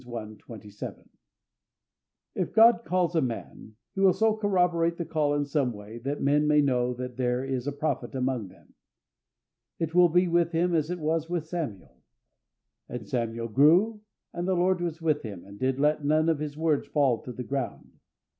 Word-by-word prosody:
27). 110 Hz, -3 st, -9 dB, 1.2 s
If -, -, -3 dB
God 230 Hz, +1 st, +6 dB
calls 180 Hz, -1 st, 0 dB
a 160 Hz, -, +3 dB
man, 115 Hz, -3 st, -6 dB, 0.2 s
He -, -, -6 dB
will 190 Hz, -2 st, +6 dB
so 220 Hz, +2 st, +2 dB
corroborate 180 Hz, -5 st, +1 dB
the 170 Hz, -, -3 dB
call 150 Hz, -2 st, 0 dB
in 145 Hz, 0 st, 0 dB
some 140 Hz, -3 st, 0 dB
way, 105 Hz, +2 st, -10 dB
that 140 Hz, +4 st, -4 dB
men 145 Hz, +2 st, +3 dB
may 150 Hz, 0 st, +4 dB
know 125 Hz, -3 st, +2 dB
that 125 Hz, 0 st, -6 dB
there 125 Hz, 0 st, 0 dB
is 130 Hz, -1 st, -3 dB
a -, -, 0 dB
prophet 145 Hz, -1 st, -3 dB
among 130 Hz, -5 st, -1 dB
them. 90 Hz, -, -20 dB, 1.0 s
It 165 Hz, -1 st, -3 dB
will 175 Hz, 0 st, +6 dB
be 180 Hz, +2 st, +3 dB
with 170 Hz, 0 st, +1 dB
him 175 Hz, +2 st, +1 dB
as 155 Hz, -1 st, +1 dB
it 180 Hz, -, -2 dB
was 160 Hz, 0 st, -1 dB
with 175 Hz, -3 st, -2 dB
Samuel. 105 Hz, -, -6 dB, 0.9 s
"And 120 Hz, -4 st, -6 dB
Samuel 115 Hz, -1 st, -2 dB
grew, 175 Hz, -, +4 dB, 0.3 s
and 175 Hz, +1 st, -3 dB
the 190 Hz, -, +2 dB
Lord 180 Hz, 0 st, +2 dB
was 170 Hz, -1 st, -4 dB
with 155 Hz, -2 st, +1 dB
him, 100 Hz, -6 st, -8 dB
and 100 Hz, +1 st, -13 dB
did 130 Hz, +1 st, 0 dB
let 150 Hz, +1 st, +2 dB
none 155 Hz, +2 st, +2 dB
of 160 Hz, -3 st, +1 dB
His 150 Hz, -1 st, -5 dB
words 160 Hz, -2 st, 0 dB
fall 135 Hz, -6 st, +1 dB
to 125 Hz, -, -8 dB
the 125 Hz, -, -6 dB
ground. 125 Hz, -, -5 dB
150 Hz, 185 wpm, -27 LUFS, 125-170 Hz, 1.2 s, God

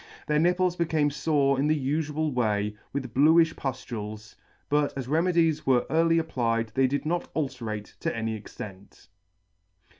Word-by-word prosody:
Their 150 Hz, 0 st, +1 dB
nipples 180 Hz, +2 st, +2 dB
became 160 Hz, -4 st, +1 dB
fore 140 Hz, -2 st, +1 dB
in 145 Hz, -, +2 dB
the 155 Hz, 0 st, +2 dB
ufual 150 Hz, +2 st, -1 dB
way, 105 Hz, -4 st, 0 dB, 0.2 s
with 130 Hz, -4 st, -4 dB
bluifli 160 Hz, +4 st, +5 dB
puftules; 110 Hz, -6 st, -6 dB, 0.3 s
but 145 Hz, -1 st, +1 dB
as 130 Hz, -3 st, -4 dB
remedies 165 Hz, 0 st, +2 dB
were 125 Hz, -2 st, +3 dB
early 165 Hz, +1 st, +3 dB
applied 115 Hz, -8 st, 0 dB
they 130 Hz, +4 st, +2 dB
did 140 Hz, +3 st, -2 dB
not 170 Hz, +2 st, -1 dB
ulcerate 115 Hz, -8 st, -4 dB
to -, -, -2 dB
any 115 Hz, -1 st, -2 dB
extent. 100 Hz, -4 st, -11 dB
140 Hz, 145 wpm, -27 LUFS, 115-160 Hz, 0.3 s, bluifli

